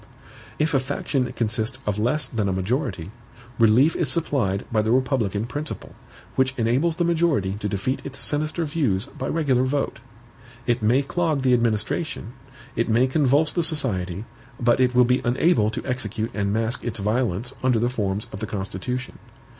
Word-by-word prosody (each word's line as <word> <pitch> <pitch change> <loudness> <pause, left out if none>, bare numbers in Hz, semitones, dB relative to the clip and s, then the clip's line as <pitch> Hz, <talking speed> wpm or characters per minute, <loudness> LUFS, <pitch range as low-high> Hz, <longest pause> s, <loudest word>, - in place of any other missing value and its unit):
If 155 +1 +1
a 135 - +4
faction 130 -1 -2
consists 115 +1 0
of 105 0 -1
less 125 +8 +1
than 105 -4 -1
a - - 0
majority, 95 - -2 0.5
relief 115 +8 +5
is - - 0
supplied 130 - 0
by 110 -2 +3
the 110 - -1
republican 120 -5 +1
principle, 145 +5 -6 0.4
which 130 0 +1
enables 130 +8 +2
the 175 - 0
majority 165 - +1
to 105 - -2
defeat 105 +7 -2
its 140 0 -6
sinister 155 +3 -1
views 140 - 0
by 130 - -6
regular 140 -6 +1
vote. 135 +2 -1 0.7
It 120 -1 +1
may 120 +6 +3
clog 155 -2 0
the 130 -1 +4
administration, 120 +2 -1 0.4
it 115 - 0
may 115 +3 +4
convulse 145 +2 +2
the 175 - +1
society; 110 - +1 0.3
but 120 +1 +3
it 125 -1 +2
will 125 0 +6
be 125 +1 +2
unable 120 -2 +3
to 110 - -5
execute 115 -4 -2
and 100 -1 -1
mask 115 +3 0
its 120 -1 -3
violence 110 +2 -1
under 130 -2 +3
the 120 +2 +2
forms 105 -4 -1
of 95 - -5
the 110 - -4
Constitution. 105 +6 -4
125 Hz, 170 wpm, -24 LUFS, 110-140 Hz, 0.7 s, will